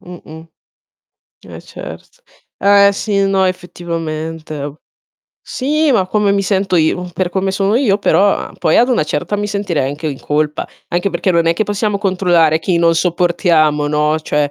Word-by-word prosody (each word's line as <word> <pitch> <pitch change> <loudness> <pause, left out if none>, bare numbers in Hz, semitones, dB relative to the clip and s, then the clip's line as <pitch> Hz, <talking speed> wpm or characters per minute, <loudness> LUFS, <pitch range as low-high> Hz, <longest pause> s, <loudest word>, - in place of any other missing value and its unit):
mh-mh. 165 -2 -12 1.0
Eh - - -9
certo. - - -11 0.4
Eh 200 0 +5
sì, 200 0 -1
no 195 -1 +2
effettivamente 165 -3 -4
e 145 0 -5 0.7
sì, 300 +3 0
ma 195 -6 +2
come 210 0 +1
mi 200 0 +1
sento 195 -1 0
io, 175 +2 +1
per 180 +2 -1
come 190 +1 -1
sono 195 +2 +1
io 220 -7 +2
però, 200 0 +3
a - - -7
poi 155 - +2
ad 245 - +4
una 240 -11 +1
certa 150 +7 -2
mi 205 0 -2
sentirei 195 -9 -2
anche 150 +3 -4
in 140 -3 -5
colpa. 150 0 -1 0.2
Anche 175 +3 0
perché 180 +1 -1
non 170 -2 +2
è 165 - +4
che 170 - -1
possiamo 205 0 -1
controllare 175 -5 +2
chi 170 +1 0
non 165 0 +3
sopportiamo, 165 -4 +1
no? 150 +1 +1
Cioè 150 -2 -1
180 Hz, 170 wpm, -16 LUFS, 160-200 Hz, 1.0 s, Eh